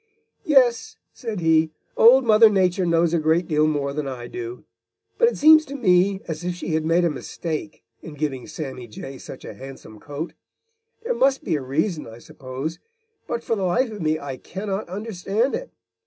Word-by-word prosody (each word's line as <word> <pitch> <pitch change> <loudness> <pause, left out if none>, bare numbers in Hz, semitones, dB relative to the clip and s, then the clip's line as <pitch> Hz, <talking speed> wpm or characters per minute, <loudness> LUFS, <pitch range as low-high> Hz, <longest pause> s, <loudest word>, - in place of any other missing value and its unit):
"Yes," 255 -7 +3 0.2
said 225 -7 -5
he, 160 -1 +3 0.3
"Old 250 +3 +7
Mother 220 0 +7
Nature 185 -2 +1
knows 170 0 +2
a 170 - +3
great 160 +3 +2
deal 155 -1 +2
more 145 -2 -1
than 150 -1 -3
I 125 -3 -6
do, 120 0 -7 0.6
but 470 - +6
it 480 - -1
seems 310 +1 +7
to 280 - -7
me 195 -4 +3
as 160 +1 -5
if 180 0 -2
she 175 - -6
had 160 -1 0
made 170 +2 +3
a - - +3
mistake 155 +2 -5 0.2
in 155 - -10
giving 140 -4 -3
Sammy 130 -6 -7
Jay 130 +4 -9
such - - -10
a - - -7
handsome 130 -5 -11
coat. 145 +6 -6 0.7
There - - 0
must 270 - +2
be 165 - 0
a 145 - -2
reason, 150 +6 -1
I 115 - -11
suppose, 130 +6 -7 0.5
but 235 0 -3
for 230 - 0
the 200 - -4
life 225 +7 +1
of 210 -3 -7
me 155 0 +1
I 135 -2 -6
cannot 195 +5 -5
understand 210 +4 -2
it. - - -4
170 Hz, 190 wpm, -23 LUFS, 150-215 Hz, 0.7 s, Old